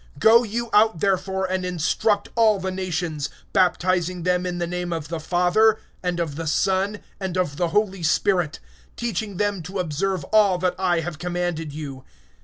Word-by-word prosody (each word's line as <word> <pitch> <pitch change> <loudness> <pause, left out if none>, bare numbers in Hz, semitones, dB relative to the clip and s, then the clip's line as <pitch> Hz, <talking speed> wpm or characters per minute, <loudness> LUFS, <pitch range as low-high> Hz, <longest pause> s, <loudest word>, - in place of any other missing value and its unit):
(19)Go 225 -3 +4
therefore, 190 0 0
and 185 0 -1
disciple 180 +4 0
all 220 -3 +4
the 190 0 -3
nations, 175 -5 -3 0.2
immersing 180 -1 +1
them 180 0 +1
in 175 -1 -3
the 175 - -1
name 175 0 -3
of 160 -3 -4
the 165 -1 -3
Father, 180 +7 +3 0.2
and 180 -1 -2
of 155 -4 -2
the 165 -1 -4
Son, 195 +6 +1 0.2
and 190 -2 -3
of 175 -6 -1
the 175 - +1
Holy 195 +1 0
Spirit; 170 0 +1 0.4
(20)teaching 215 -4 -3
them 205 -2 0
to 180 +5 -6
observe 185 +2 -1
all 205 -4 +5
things, 180 0 +1
whatever - - -11 0.3
I - - -1
commanded 175 -1 -3
you. 140 -3 -7
180 Hz, 165 wpm, -23 LUFS, 170-200 Hz, 0.4 s, all